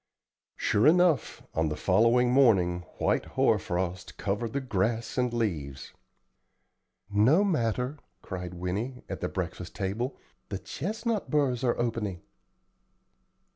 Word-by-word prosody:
Sure 105 +7 +2
enough, 160 -8 +3
on 80 -1 +1
the 75 - -2
following 115 +8 +3
morning 100 -10 +4 0.2
white - - +1
hoar - - +4
frost 90 0 -3
covered 105 +4 -2
the 140 - -1
grass 115 -2 -1
and 125 -2 +1
leaves. 80 - -3 1.1
"No 110 - +4
matter," 130 - 0 0.2
cried 90 -2 -6
Winnie, 100 +9 -3
at - - -6
the - - -1
breakfast - - -5
table; 110 +8 -2 0.3
"the 100 - -3
chestnut 215 - -3
burrs 135 -5 +1
are 120 - +2
opening." 110 -7 -2
115 Hz, 120 wpm, -28 LUFS, 95-130 Hz, 1.1 s, morning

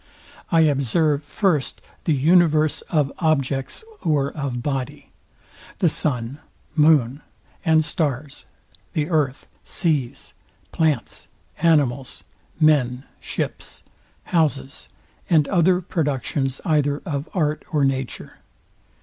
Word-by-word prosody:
I 165 -2 +5
observe 145 0 +2
first 155 -1 0 0.3
the 160 - +3
universe 155 +1 +3
of 150 -5 +1
objects 140 - 0 0.2
or 145 -4 +1
of 135 -5 -4
body: 140 0 -4 0.7
The 175 - +3
sun, 125 -2 -2 0.4
moon 150 -4 +4 0.4
and 160 -3 +4
stars; 145 -3 -3 0.5
the 155 +3 -1
earth, 145 -5 0 0.2
seas, 150 -9 -2 0.4
plants, 155 -6 0 0.3
animals, 140 -6 +1 0.4
men, 135 -5 +3 0.2
ships, - - -5 0.4
houses, 145 -5 -1 0.4
and 155 -5 +4
other 180 0 +3
productions 145 -5 -1
either 145 -2 +1
of 145 -3 -3
art 155 -3 0
or 150 -4 +2
nature. 135 -2 -3
150 Hz, 100 wpm, -22 LUFS, 135-160 Hz, 0.7 s, I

